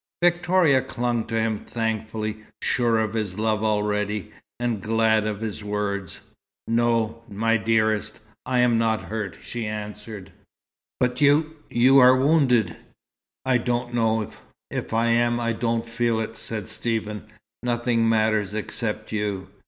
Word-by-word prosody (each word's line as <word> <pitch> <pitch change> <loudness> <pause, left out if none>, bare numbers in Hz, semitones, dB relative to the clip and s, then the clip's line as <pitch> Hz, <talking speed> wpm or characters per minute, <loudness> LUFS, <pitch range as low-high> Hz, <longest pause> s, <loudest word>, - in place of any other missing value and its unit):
Victoria 175 -5 +4
clung 120 -2 -2
to 115 - -4
him 110 -1 0
thankfully, 110 -1 -3 0.3
sure 120 -2 +2
of 110 -1 0
his 105 -4 -3
love 110 -1 0
already, 105 -1 0 0.3
and 120 -4 -1
glad 110 0 +2
of 105 0 -3
his 110 -2 -4
words. 100 -3 -3 0.5
"No, 115 -1 +1
my 115 +3 +1
dearest, 110 -1 +1 0.3
I'm 125 -2 +2
not 110 -1 +1
hurt," 105 -6 -4
she 120 -2 -4
answered. 105 -2 -7 0.7
"But 125 +1 0
you 150 +2 +4
you 130 +3 +5
are 130 0 +8
wounded!" 130 - +3 0.7
"I 130 -1 +3
don't 120 0 -2
know. 110 -2 +1 0.4
If - - -4
I 115 +1 +2
am, 120 0 +2
I 115 -1 0
don't 115 0 -1
feel 115 -1 0
it," 110 0 -4
said 110 -4 -6
Stephen. 110 -2 -3 0.3
"Nothing 120 -1 +1
matters 110 -2 +1
except 110 0 -4
you." 105 -3 -2
115 Hz, 135 wpm, -24 LUFS, 105-120 Hz, 0.7 s, are